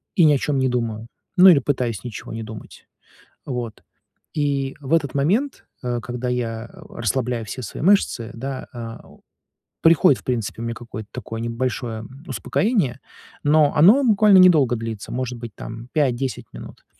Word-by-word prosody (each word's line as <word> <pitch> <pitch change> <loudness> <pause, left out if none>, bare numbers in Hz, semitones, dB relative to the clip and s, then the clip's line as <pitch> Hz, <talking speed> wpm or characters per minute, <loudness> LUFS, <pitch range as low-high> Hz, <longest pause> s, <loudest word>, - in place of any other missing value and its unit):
и 175 - +5
ни 150 - +6
о - - +3
чём 140 +1 -1
не 130 - +2
думаю, 115 -2 -2 0.3
ну 185 +1 +9
или 155 -6 +7
пытаюсь 125 -7 -2
ничего 115 -1 -7
не 115 0 -5
думать. 110 -1 -11 0.6
Вот, 120 -5 -5 0.5
и 140 -3 -1
в 140 +2 -4
этот 145 -5 +2
момент, 200 - 0 0.2
э, 120 -1 -1
когда 125 +1 -4
я 115 -2 -3 0.2
расслабляю 120 0 -2
все 130 +5 -6
свои 125 - -6
мышцы, 165 - +2
да, 130 +3 -5
э, 115 -1 -7 0.8
приходит, 165 -5 +5
в - - -29
принципе, 115 -3 -2
у - - -3
меня 115 0 -3
какое-то 110 -2 -9
такое 115 -2 -6
небольшое, 115 -1 -3
м, 130 +7 -12
успокоение, 195 - 0 0.4
но 150 0 +4
оно 210 - +6
буквально 210 -3 +6
недолго 150 -10 +6
длится, 110 -2 -6
может 125 -1 -3
быть, 115 -3 -8
там, 115 +2 -8
5-10 135 -3 0
минут, - - -11
125 Hz, 160 wpm, -22 LUFS, 115-145 Hz, 0.8 s, ну